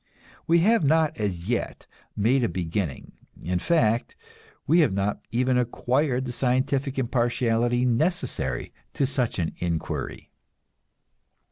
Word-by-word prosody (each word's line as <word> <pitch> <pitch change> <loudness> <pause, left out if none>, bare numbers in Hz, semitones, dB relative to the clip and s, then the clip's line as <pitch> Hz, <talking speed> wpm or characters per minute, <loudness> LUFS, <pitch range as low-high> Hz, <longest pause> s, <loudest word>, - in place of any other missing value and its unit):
We 170 0 +4
have 220 +1 +4
not 155 +1 +3
as 95 -4 -3
yet 120 0 -2 0.3
made 120 +5 +2
a 115 - +1
beginning; 85 -4 -3 0.3
in 90 +2 -1
fact, 115 - +1 0.5
we 160 +5 +4
have 150 - +3
not 100 +1 -1
even 125 +1 +1
acquired 125 +2 0
the 125 - -4
scientific 130 +2 0
impartiality 120 -1 +1
necessary 125 - -1 0.2
to 140 - +2
such 130 -3 -1
an 85 -4 -1
inquiry. 85 -2 -4
125 Hz, 120 wpm, -25 LUFS, 105-135 Hz, 0.5 s, We